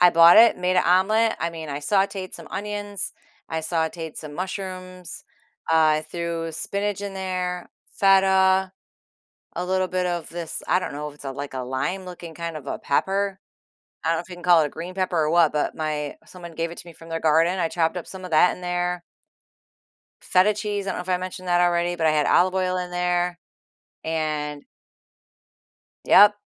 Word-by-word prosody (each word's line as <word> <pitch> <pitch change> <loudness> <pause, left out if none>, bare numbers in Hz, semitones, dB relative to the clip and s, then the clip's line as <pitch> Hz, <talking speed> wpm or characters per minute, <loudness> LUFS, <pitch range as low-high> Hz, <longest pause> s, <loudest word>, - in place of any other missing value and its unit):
I 180 0 +8
bought 170 +1 +8
it, 230 -3 +7
made 180 0 +1
an - - +4
omelet. 215 +6 +3
I 170 - 0
mean, 160 -2 -7
I 140 - -3
sautéed 195 +2 0
some 165 -2 -10
onions, 205 +1 -4 0.4
I 160 0 -2
sautéed 160 0 -2
some 150 -1 -7
mushrooms, 185 -1 -6 0.5
uh, - - +5
I 155 -1 +4
threw 170 -1 -3
spinach 200 +5 -2
in 200 -1 -5
there, 180 -2 -3 0.2
feta, 190 -1 +4 0.8
a 175 - -2
little 185 0 +1
bit 180 0 -1
of 175 -2 -3
this 170 -2 -5
I 180 - +4
don't - - -4
know 150 +1 -5
if 145 - -12
it's 150 - -13
a 135 - -4
like 140 +1 -6
a - - -3
lime-looking 175 +6 -4
kind 170 -1 -5
of 145 -2 -9
a - - -3
pepper. 195 +6 0 0.7
I 165 - +2
don't 165 - 0
if 170 - -12
you 180 - -8
can 175 - -12
call 175 -2 +6
it - - +1
a - - -5
green 180 +5 -7
pepper 185 -2 -1
or 155 -1 +2
what, 170 -2 +4
but 150 -1 -1
my 150 -2 -3
someone 175 -2 -11
gave 165 +1 -2
it 170 - -10
to - - -10
me 170 - -10
from 165 +1 -14
their 165 0 -3
garden. 165 +4 +3
I 170 -2 +1
chopped 165 +1 0
up 175 - -5
some 190 -1 -8
of 180 - -7
that 160 +3 +5
in - - -13
there 180 0 -2 1.2
feta 190 +3 +3
cheese, 205 -1 -3
I - - -1
don't - - -3
know 180 - -3
if 180 - -14
I 180 - +2
mentioned 185 0 -6
that 175 0 +3
already, 175 0 +2
but 160 -2 +1
I - - +5
had 150 -2 +2
olive 185 +1 +4
oil 185 -1 0
in 180 0 -4
there, 180 0 0 0.7
and 150 -2 -2 1.4
Yep, 205 +1 +7
175 Hz, 205 wpm, -24 LUFS, 160-185 Hz, 1.4 s, I